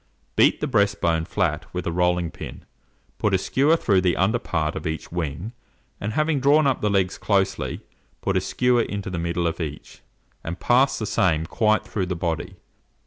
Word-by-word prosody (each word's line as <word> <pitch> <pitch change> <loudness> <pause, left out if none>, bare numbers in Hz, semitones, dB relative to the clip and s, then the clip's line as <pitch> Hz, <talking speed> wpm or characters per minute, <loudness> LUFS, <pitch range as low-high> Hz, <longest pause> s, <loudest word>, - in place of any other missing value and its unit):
Beat - - +4
the - - +1
breast 100 -1 +2
bone 80 -1 +1
flat - - -1
with 90 - -3
a 85 - -1
rolling 90 -1 +1
pin, - - -9 0.5
put 105 -2 +2
a - - +4
skewer 140 - +2
through 100 - +2
the 90 -1 +1
under 110 +6 +2
part 80 -8 -2
of 80 +2 -4
each 80 0 -5
wing, 85 +4 -3 0.5
and 105 +2 -3
having 155 0 +1
drawn 145 +3 +4
up 135 -3 +1
the 105 - +1
legs 95 -2 +1
closely, 100 -2 0 0.4
put - - -1
a - - +3
skewer 125 -1 +2
into 100 -3 -4
the 90 - -3
middle 85 +1 -1
of 85 +1 -1
each, 75 -2 -7 0.4
and 85 +2 -5
pass 130 +3 +3
the 110 - -3
same 80 -6 +1
quite 110 +4 +1
through 95 -4 -2
the 90 - -2
body. 85 -1 -3
95 Hz, 195 wpm, -24 LUFS, 85-110 Hz, 0.5 s, Beat